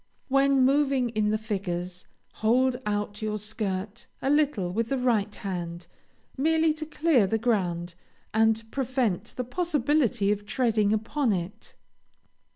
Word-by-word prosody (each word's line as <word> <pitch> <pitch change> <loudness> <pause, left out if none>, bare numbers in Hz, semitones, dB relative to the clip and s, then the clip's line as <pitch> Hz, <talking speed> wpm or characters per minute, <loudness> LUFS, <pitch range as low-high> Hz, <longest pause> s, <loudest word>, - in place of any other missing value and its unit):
When 275 -1 +4
moving 275 -2 +2
in 215 -2 0
the 215 - +1
figures, 185 -4 -4 0.3
hold 250 +3 +2
out 205 0 -2
your 215 -1 -1
skirt 210 0 -4
a 270 - 0
little 285 -12 +2
with 230 +2 -1
the 270 - 0
right 225 -5 +1
hand, 175 -3 -5 0.5
merely 320 +3 +2
to 310 0 -6
clear 310 -9 +3
the 225 - +1
ground, 180 -7 -1 0.4
and 225 0 +3
prevent 255 -7 -1
the 250 - -1
possibility 275 - +1
of 205 0 -3
treading 220 -5 +1
upon 220 +3 0
it. 180 +2 -6
225 Hz, 135 wpm, -27 LUFS, 205-265 Hz, 0.5 s, When